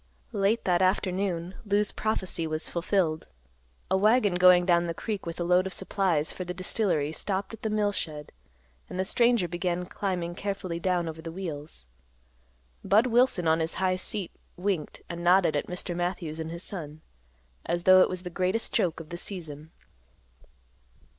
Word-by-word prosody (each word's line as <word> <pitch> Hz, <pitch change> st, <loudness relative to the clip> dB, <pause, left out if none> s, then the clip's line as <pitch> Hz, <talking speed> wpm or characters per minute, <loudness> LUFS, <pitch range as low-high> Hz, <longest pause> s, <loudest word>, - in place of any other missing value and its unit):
Late 205 Hz, +2 st, +1 dB
that 180 Hz, -1 st, +2 dB
afternoon 185 Hz, -2 st, 0 dB
Lou's 205 Hz, -1 st, +2 dB
prophecy 190 Hz, -6 st, -1 dB
was 155 Hz, +1 st, -1 dB
fulfilled. 170 Hz, -2 st, 0 dB, 0.6 s
A -, -, +4 dB
wagon 210 Hz, +1 st, +4 dB
going 180 Hz, 0 st, +6 dB
down 175 Hz, -1 st, +3 dB
the 165 Hz, -, -3 dB
Creek 205 Hz, -3 st, -4 dB
with 165 Hz, +1 st, -5 dB
a -, -, 0 dB
load 180 Hz, +2 st, +3 dB
of 190 Hz, -, -6 dB
supplies 185 Hz, -5 st, 0 dB
for 185 Hz, -, -5 dB
the 180 Hz, 0 st, -5 dB
distillery 185 Hz, -6 st, 0 dB
stopped 195 Hz, +5 st, -2 dB
at 225 Hz, -, -9 dB
the 220 Hz, -, -1 dB
mill 210 Hz, -1 st, +1 dB
shed 150 Hz, -6 st, -5 dB, 0.6 s
and 185 Hz, -, -5 dB
the 190 Hz, -, +1 dB
stranger 235 Hz, -3 st, +3 dB
began 175 Hz, +1 st, -2 dB
climbing 180 Hz, -3 st, -3 dB
carefully 185 Hz, -3 st, -4 dB
down 175 Hz, -1 st, 0 dB
over 160 Hz, 0 st, -6 dB
the 165 Hz, 0 st, -6 dB
wheels. 155 Hz, -, -6 dB, 1.0 s
Budd 215 Hz, +5 st, +4 dB
Wilson 240 Hz, -7 st, +3 dB
on 160 Hz, +1 st, +4 dB
his 160 Hz, 0 st, -2 dB
high 185 Hz, -1 st, +1 dB
seat 185 Hz, 0 st, -2 dB, 0.3 s
winked 180 Hz, -4 st, -2 dB
and 170 Hz, 0 st, -6 dB
nodded 175 Hz, -3 st, +4 dB
at 145 Hz, -, -1 dB
Mr. 180 Hz, 0 st, -4 dB
Matthews 175 Hz, -3 st, -3 dB
and 160 Hz, 0 st, -4 dB
his 170 Hz, +2 st, -6 dB
son, 155 Hz, -5 st, -7 dB, 0.6 s
as 175 Hz, 0 st, -2 dB
though 185 Hz, 0 st, +8 dB
it -, -, +4 dB
was 185 Hz, -1 st, -5 dB
the 180 Hz, -, -6 dB
greatest 185 Hz, +5 st, -1 dB
joke 170 Hz, -3 st, +1 dB
of 160 Hz, -2 st, -10 dB
the 175 Hz, -, -5 dB
season. 160 Hz, -5 st, -7 dB
180 Hz, 175 wpm, -28 LUFS, 170-195 Hz, 1.0 s, though